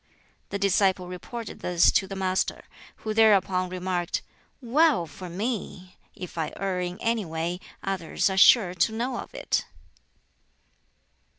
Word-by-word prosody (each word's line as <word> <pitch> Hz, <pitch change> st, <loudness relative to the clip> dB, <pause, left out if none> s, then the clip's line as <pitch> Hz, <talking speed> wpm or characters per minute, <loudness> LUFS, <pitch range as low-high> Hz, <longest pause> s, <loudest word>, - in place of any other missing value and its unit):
The 200 Hz, -, -2 dB
disciple 195 Hz, -2 st, +2 dB
reported 200 Hz, +5 st, -7 dB
this 175 Hz, -1 st, +3 dB
to 190 Hz, -, +1 dB
the 195 Hz, -, -6 dB
Master, 190 Hz, -1 st, -1 dB, 0.4 s
who 215 Hz, -, -1 dB
thereupon 195 Hz, -4 st, +4 dB
remarked, 180 Hz, -1 st, -2 dB, 0.4 s
"Well 270 Hz, -, +3 dB
for 180 Hz, +3 st, -9 dB
me! 185 Hz, -2 st, -4 dB, 0.2 s
If 180 Hz, -2 st, -7 dB
I 160 Hz, -, -2 dB
err 190 Hz, -1 st, -2 dB
in 180 Hz, 0 st, -4 dB
any 230 Hz, -1 st, +1 dB
way, 165 Hz, +1 st, -3 dB, 0.2 s
others 190 Hz, -4 st, -1 dB
are 190 Hz, -, -1 dB
sure 190 Hz, -1 st, +6 dB
to 185 Hz, +5 st, +2 dB
know 240 Hz, +3 st, -2 dB
of -, -, -8 dB
it." -, -, 0 dB
190 Hz, 135 wpm, -26 LUFS, 180-215 Hz, 0.4 s, sure